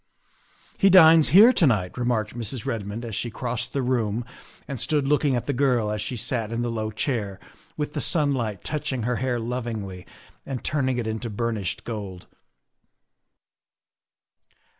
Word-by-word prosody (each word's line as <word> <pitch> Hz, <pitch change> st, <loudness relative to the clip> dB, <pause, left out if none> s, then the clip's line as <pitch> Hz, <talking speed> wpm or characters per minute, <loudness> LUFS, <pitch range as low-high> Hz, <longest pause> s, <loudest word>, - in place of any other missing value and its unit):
' -, -, -32 dB
He 195 Hz, -, +5 dB
dines 165 Hz, -4 st, +8 dB
here 220 Hz, +8 st, +8 dB
to 165 Hz, -, +4 dB
night," 95 Hz, -8 st, 0 dB
remarked 120 Hz, -3 st, -1 dB
Mrs. 115 Hz, 0 st, -5 dB
Redmond 110 Hz, +1 st, -4 dB
as 115 Hz, -, -6 dB
she 120 Hz, -, -2 dB
crossed 120 Hz, +1 st, -4 dB
the 135 Hz, -, -1 dB
room 120 Hz, -2 st, -1 dB, 0.4 s
and 135 Hz, -3 st, -5 dB
stood 145 Hz, 0 st, +1 dB
looking 145 Hz, -2 st, +2 dB
at 120 Hz, -, -2 dB
the 140 Hz, -, -1 dB
girl 125 Hz, -5 st, +1 dB
as 105 Hz, -1 st, -2 dB
she 115 Hz, +4 st, -4 dB
sat 115 Hz, -1 st, -2 dB
in 115 Hz, +1 st, -2 dB
the 120 Hz, -, -2 dB
low 110 Hz, -1 st, -2 dB
chair 110 Hz, -4 st, -2 dB, 0.4 s
with 150 Hz, -1 st, -3 dB
the -, -, -2 dB
sunlight 130 Hz, -, 0 dB
touching 145 Hz, -5 st, -2 dB
her 125 Hz, +1 st, 0 dB
hair 125 Hz, -1 st, -1 dB
lovingly 115 Hz, -6 st, -5 dB, 0.4 s
and 130 Hz, -3 st, -6 dB
turning 130 Hz, -3 st, 0 dB
it 120 Hz, -, -2 dB
into 110 Hz, +2 st, -3 dB
burnished 105 Hz, -4 st, -3 dB
gold. 100 Hz, -6 st, -6 dB
120 Hz, 160 wpm, -24 LUFS, 110-135 Hz, 0.4 s, dines